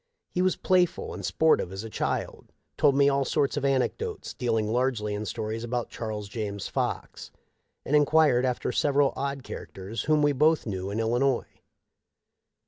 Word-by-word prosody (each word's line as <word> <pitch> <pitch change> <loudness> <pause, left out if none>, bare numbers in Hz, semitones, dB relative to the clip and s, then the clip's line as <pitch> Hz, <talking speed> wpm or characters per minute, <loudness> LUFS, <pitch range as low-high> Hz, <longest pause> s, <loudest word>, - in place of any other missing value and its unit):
He 180 - 0
was 185 0 +2
playful 180 -2 +1
and - - -7
sportive 160 - +2
as 95 +2 -6
a - - -6
child, - - -3 0.2
told 140 -2 +3
me 140 0 +5
all 140 0 +2
sorts 140 +1 0
of 145 - -2
anecdotes, 140 - -1
dealing 115 -3 0
largely 115 -2 0
in 105 +1 -4
stories 110 +1 -4
about 120 0 -3
Charles 105 -2 -5
James 100 -2 -4
Fox, - - -3 0.6
and 150 - +1
enquired 150 -3 +4
after 125 -1 -1
several 140 +1 +2
odd 140 -1 -3
characters 100 -2 -6
whom 155 -1 +3
we 145 - +4
both 155 +3 +3
knew 95 -3 -3
in 105 +2 -3
Illinois. 120 +3 0
130 Hz, 160 wpm, -27 LUFS, 110-145 Hz, 0.6 s, me